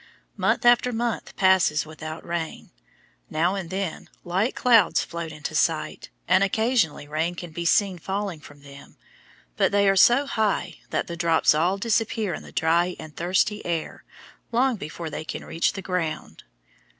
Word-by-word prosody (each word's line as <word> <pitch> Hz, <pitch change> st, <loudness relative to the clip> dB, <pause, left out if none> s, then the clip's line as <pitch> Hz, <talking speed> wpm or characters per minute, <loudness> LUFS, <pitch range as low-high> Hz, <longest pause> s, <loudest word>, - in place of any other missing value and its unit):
Month -, -, 0 dB
after 240 Hz, +1 st, +5 dB
month 235 Hz, 0 st, -3 dB
passes 185 Hz, -6 st, +3 dB
without 155 Hz, +1 st, -8 dB
rain. 170 Hz, -1 st, -5 dB, 0.6 s
Now 165 Hz, +4 st, +1 dB
and 190 Hz, -4 st, -4 dB
then 190 Hz, -2 st, -4 dB
light 190 Hz, +7 st, 0 dB
clouds 235 Hz, -5 st, +4 dB
float 170 Hz, -1 st, -6 dB
into 150 Hz, 0 st, -6 dB
sight, 155 Hz, 0 st, -1 dB, 0.2 s
and 185 Hz, +2 st, +4 dB
occasionally 220 Hz, -, +1 dB
rain 160 Hz, +4 st, -1 dB
can 175 Hz, -1 st, -8 dB
be 170 Hz, +2 st, -5 dB
seen 190 Hz, +1 st, +2 dB
falling 195 Hz, -1 st, -3 dB
from 145 Hz, -2 st, -15 dB
them, 140 Hz, 0 st, -14 dB, 0.6 s
but -, -, +3 dB
they 200 Hz, 0 st, +3 dB
are 195 Hz, -, +4 dB
so 240 Hz, +8 st, +5 dB
high 220 Hz, -6 st, -1 dB
that -, -, -1 dB
the 170 Hz, -, -6 dB
drops 165 Hz, -3 st, +3 dB
all 175 Hz, +6 st, +1 dB
disappear 220 Hz, -2 st, 0 dB
in -, -, -5 dB
the -, -, -13 dB
dry 170 Hz, +3 st, +1 dB
and 155 Hz, -1 st, -10 dB
thirsty 190 Hz, +5 st, 0 dB
air 170 Hz, -2 st, -4 dB, 0.5 s
long 250 Hz, +2 st, +2 dB
before 160 Hz, -2 st, -7 dB
they -, -, -5 dB
can -, -, -6 dB
reach 165 Hz, -, 0 dB
the 195 Hz, -, -7 dB
ground. 180 Hz, -4 st, -4 dB
180 Hz, 160 wpm, -24 LUFS, 160-205 Hz, 0.6 s, after